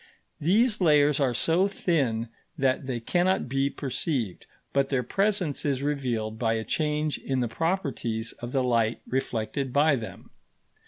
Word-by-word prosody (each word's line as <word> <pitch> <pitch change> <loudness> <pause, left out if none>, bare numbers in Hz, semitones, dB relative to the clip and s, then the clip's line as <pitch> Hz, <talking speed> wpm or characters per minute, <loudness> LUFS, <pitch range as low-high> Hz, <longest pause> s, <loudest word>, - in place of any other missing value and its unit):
These 210 - +3
layers 150 -3 +4
are 130 -4 +1
so 170 - +3
thin 135 - 0 0.3
that 135 -1 +1
they 125 -3 -2
cannot 180 +9 +1
be 135 +2 +1
perceived, 130 - -3 0.3
but 140 -1 +2
their 135 -3 +1
presence 195 - 0
is 140 -2 0
revealed 120 -7 -2
by 115 -2 +1
a 110 0 -1
change 150 +2 -1
in 130 -1 -2
the 120 - 0
properties 120 -6 -2
of 120 0 -6
the 130 -1 +1
light 115 -2 +1
reflected 125 0 -2
by 145 +2 +4
them. 115 -4 -8
135 Hz, 150 wpm, -27 LUFS, 120-155 Hz, 0.3 s, layers